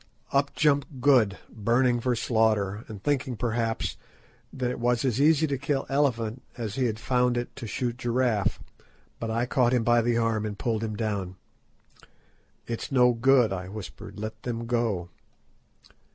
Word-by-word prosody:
Up 140 0 +1
jumped 145 -3 +1
Good, 120 -7 +4
burning 120 +3 +1
for 125 +1 0
slaughter, 110 -3 +1
and 105 -3 -9
thinking, 135 -4 0
perhaps, 115 -1 -1 0.5
that 125 -2 -2
it 125 - -5
was 120 +1 +1
as 130 0 +1
easy 155 +1 +5
to 140 -4 -2
kill 145 -1 -1
elephant 125 -4 0 0.2
as 110 -4 -4
he 130 +2 0
had 110 -3 -1
found 125 +1 +1
it 120 - -4
to 115 - -6
shoot 120 +1 -2
giraffe, 120 -4 +1 0.6
but 115 - -3
I 115 +2 0
caught 125 0 +2
him 120 - +1
by 120 +1 +4
the 120 0 +1
arm 115 -2 +1
and 105 -2 -4
pulled 110 0 -1
him 110 -1 -3
down. 100 -4 -3 1.3
"It's 115 +3 -5
no 125 -2 +5
good," 120 -2 +4
I 90 -1 -5
whispered, 105 -1 -9
"let 110 +1 -6
them 115 -1 -4
go." 115 -7 -1
120 Hz, 165 wpm, -27 LUFS, 110-130 Hz, 1.3 s, easy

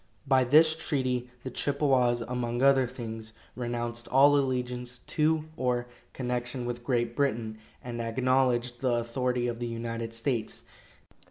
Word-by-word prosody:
By 130 -2 +4
this 155 +5 +6
treaty 130 -6 -1
the 130 - -5
Chippewas, 130 -3 +2
among 120 +1 -2
other 135 -2 +5
things, 115 -3 -7 0.2
renounced 120 -1 -3
all 140 +2 +6
allegiance 125 -2 -1
to 155 +4 0
or 125 -4 0 0.3
connection 125 0 -3
with 120 0 -4
Great 120 -2 0
Britain, 115 -6 -1 0.2
and 120 -1 -4
acknowledged 125 0 +1
the 125 -2 +2
authority 120 +1 -1
of 120 -1 -3
the 120 - -2
United 115 0 -4
States. 115 -2 -2
125 Hz, 135 wpm, -29 LUFS, 120-130 Hz, 0.3 s, this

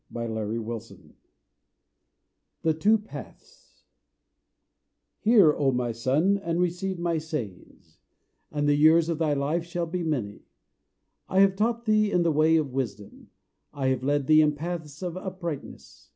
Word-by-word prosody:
Archibald 110 -1 -3
Lampman 115 0 -8 1.5
THE 160 - +2
TWO 205 +8 +3
PATHS 210 0 -13 1.4
Hear, 210 -9 +5
O 140 -3 +1
my 125 -1 -1
son, 145 - +1
and 170 -3 -2
receive 180 +2 -1
my 170 -1 -1
sayings; 130 - -8 0.5
And 145 -1 -1
the 145 - +4
years 160 +3 +5
of 165 -2 -2
thy 155 -3 +1
life 145 +4 -1
shall 170 0 -3
be 175 +2 -4
many. 125 -11 -3 0.8
I 190 - +3
have 195 -1 +4
taught 230 +3 -1
thee 215 -1 +2
in 180 - +2
the 165 - +2
way 155 +2 +3
of 150 -5 0
wisdom; 110 -7 -5 0.5
I 135 -2 0
have 130 -1 0
led 145 +1 0
thee 155 +2 +6
in 150 -1 +3
paths 160 0 -6
of 175 -2 -4
uprightness. 175 - -7
155 Hz, 145 wpm, -26 LUFS, 135-180 Hz, 1.5 s, thee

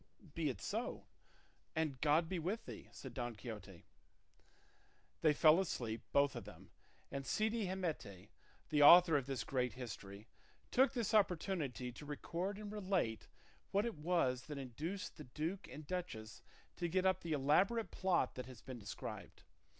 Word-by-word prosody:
"Be - - 0
it - - -4
so, - - -3 0.7
and 155 -5 -1
God 155 +2 +4
be 180 0 -2
with 200 +8 -2
thee," - - -9
said - - -9
Don 120 -3 -3
Quixote. 105 -5 -8 1.4
They 155 - +6
fell 155 +3 +6
asleep, 120 -11 -2
both 140 -1 +4
of - - -5
them, - - -13 0.4
and 140 0 -3
Cide 215 +9 +1
Hamete, 155 - -4 0.4
the 150 -1 +3
author 170 +2 +10
of 140 -2 +1
this 135 -5 -2
great 125 0 0
history, 105 -4 -8 0.4
took 265 +2 +4
this 235 -4 -1
opportunity 170 - +1
to 145 - -10
record 175 +6 -3
and 210 -1 -6
relate 190 - -1 0.4
what 200 +3 +2
it 235 - -1
was 150 -6 +1
that 150 -2 -5
induced 150 - -5
the 150 - -8
duke 160 +9 -4
and 150 - -9
duchess 140 - -5 0.4
to 175 - -1
get 185 +2 +1
up 185 -1 +3
the 165 -2 -2
elaborate 185 - +3
plot 180 -8 +1
that 125 -1 -6
has 130 -3 -10
been 130 -2 -7
described. 105 - -7
150 Hz, 160 wpm, -38 LUFS, 125-185 Hz, 1.4 s, author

